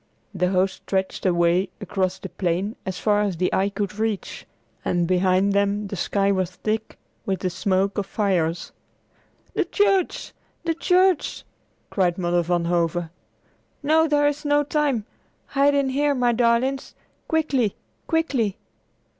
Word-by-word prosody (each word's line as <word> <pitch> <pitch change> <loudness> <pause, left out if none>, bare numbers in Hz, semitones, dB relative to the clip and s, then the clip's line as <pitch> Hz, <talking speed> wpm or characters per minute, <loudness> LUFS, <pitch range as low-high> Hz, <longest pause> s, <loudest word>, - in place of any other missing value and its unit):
The 180 -1 +1
host 190 0 +1
stretched 190 0 -2
away 175 +1 +2
across 190 -2 -1
the - - -8
plain 185 +4 -1
as 185 -1 -3
far 210 -1 +2
as 200 -5 -1
the 180 +2 0
eye 195 +1 +2
could 200 0 -4
reach, 220 -3 -3 0.4
and 175 -1 0
behind 185 +2 +2
them 200 0 +1
the 200 - -4
sky 200 +2 +1
was 185 -3 0
thick 215 +4 -3 0.3
with 190 -1 -1
the 185 - -1
smoke 190 +2 0
of 195 - -3
fires. 180 -5 0 0.8
"The - - +1
church! 395 -3 +1 0.3
the 335 -1 0
church!" 365 0 +2 0.5
cried 180 -3 +1
Mother 175 -1 +1
Van 175 0 0
Hove. 170 -1 0 0.7
"No, 320 +2 +4
there 290 -1 +3
is 290 0 -2
not 290 -1 +1
time. 285 -8 +1 0.4
Hide 285 0 +2
in 280 -1 +2
here, 285 +2 +1
my 245 -2 +2
darlings. 240 +3 +1 0.3
Quickly! 280 -9 +1 0.3
Quickly!" 270 - 0
200 Hz, 145 wpm, -23 LUFS, 185-275 Hz, 0.8 s, No